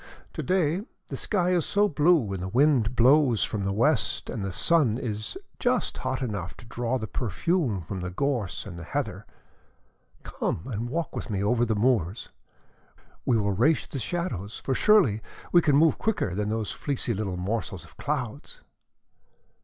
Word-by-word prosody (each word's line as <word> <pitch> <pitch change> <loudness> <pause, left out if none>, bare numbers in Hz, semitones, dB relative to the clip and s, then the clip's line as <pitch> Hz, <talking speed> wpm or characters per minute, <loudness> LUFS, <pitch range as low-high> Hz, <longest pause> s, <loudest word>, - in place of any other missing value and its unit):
To - - -3
day 180 -1 +1 0.3
the - - -4
sky 180 -4 +1
is 175 -3 +2
so 205 +5 +2
blue 150 - +3
and 95 - -4
the 95 - -3
wind 125 0 +3
blows 130 -1 +5
from 100 -3 -2
the 100 - 0
west 120 +7 +1
and 105 - -4
the 95 - -2
sun 135 - +3
is 110 - -4 0.2
just 250 -1 0
hot 130 0 -2
enough 100 -7 -4
to - - -13
draw 120 +2 -2
the 110 - -4
perfume 120 - -1
from 95 +3 -6
the 90 0 -4
gorse 110 -2 -2
and 90 -4 -8
the - - -7
heather. - - -4 1.0
Come - - -3
and 120 -1 -4
walk 165 +3 -3
with - - -5
me 100 -2 -1
over 120 +3 +2
the 110 - +1
moors. 105 -3 +1 1.0
We 120 - +4
will 100 -2 +1
race 135 +11 +2
the 135 - -6
shadows, 115 - -3
for 135 - +1
surely 140 - +4 0.3
we 175 - +6
can 145 -4 +3
move 160 +2 +4
quicker 210 - 0
than 105 +2 -1
those 110 -2 -1
fleecy 135 -4 -2
little 95 -3 -3
morsels 95 +1 -3
of - - -17
clouds!" - - -4
120 Hz, 175 wpm, -27 LUFS, 100-150 Hz, 1.0 s, we